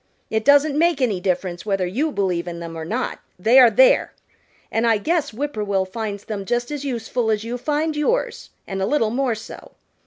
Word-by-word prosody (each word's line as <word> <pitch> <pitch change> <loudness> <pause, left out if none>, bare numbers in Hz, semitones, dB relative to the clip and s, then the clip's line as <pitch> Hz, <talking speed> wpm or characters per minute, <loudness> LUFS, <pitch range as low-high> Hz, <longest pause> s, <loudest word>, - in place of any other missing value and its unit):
It 220 0 0
doesn't 285 +2 +4
make 335 -3 +3
any 225 -8 +1
difference 180 -2 -2
whether 195 -3 0
you 265 - -1
believe 180 -6 -1
in 170 -1 -5
them 165 -1 -7
or 160 - -5
not, 225 +10 -3 0.2
they 225 +8 +5
are 250 -2 +8
there. - - +4 0.6
And 225 +1 +1
I 225 -1 +4
guess 320 +9 -1
Whip 285 +6 -4
poor 215 - -3
will 195 -2 0
finds 205 +1 -5
them 210 -3 -4
just 240 +6 -2
as 290 -1 -4
useful 240 -3 -2
as 215 -1 0
you 235 +2 -4
find 300 +5 -1
yours, 385 +12 -1 0.2
and 195 0 -4
a 190 - 0
little 225 -4 +1
more 250 -1 0
so. 220 - -11
225 Hz, 210 wpm, -21 LUFS, 195-280 Hz, 0.6 s, are